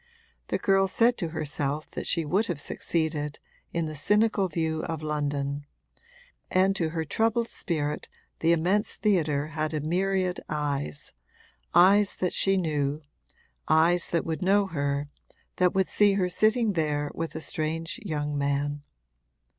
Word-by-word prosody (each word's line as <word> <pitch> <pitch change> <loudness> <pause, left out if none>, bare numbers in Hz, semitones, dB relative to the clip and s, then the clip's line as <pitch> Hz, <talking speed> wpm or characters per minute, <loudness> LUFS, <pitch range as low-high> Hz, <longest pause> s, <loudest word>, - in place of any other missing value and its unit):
The - - 0
girl 195 0 +3
said 235 +5 +3
to 170 - -1
herself 150 -2 -3
that - - -5
she 165 - +1
would 195 +9 +1
have 170 -5 -3
succeeded, 155 -1 -2 0.3
in 170 -1 -1
the 155 - -5
cynical 205 +6 +2
view 160 -1 -1
of 160 -2 -4
London; 145 -1 -2 0.8
and 190 +1 +3
to 165 -4 0
her 160 0 -3
troubled 225 +7 0
spirit 150 -4 -3 0.3
the 165 - +3
immense 180 +6 +1
theatre 155 -8 +1
had 155 0 -2
a - - 0
myriad 185 +3 0
eyes, 140 - -3 0.6
eyes 200 +3 +6
that 180 - -1
she 195 0 +3
knew, 150 -3 -1 0.6
eyes 170 +2 +4
that 170 - -1
would 160 +1 -3
know 200 +2 +3
her, 145 -4 -2 0.5
that 180 0 +2
would 190 0 +3
see 205 +1 +3
her 185 -2 +1
sitting 215 +4 +2
there 150 -3 -1
with 165 0 -4
a - - -3
strange 160 +2 -2
young 150 -5 -2
man. 145 +1 -1
160 Hz, 145 wpm, -27 LUFS, 150-190 Hz, 0.8 s, eyes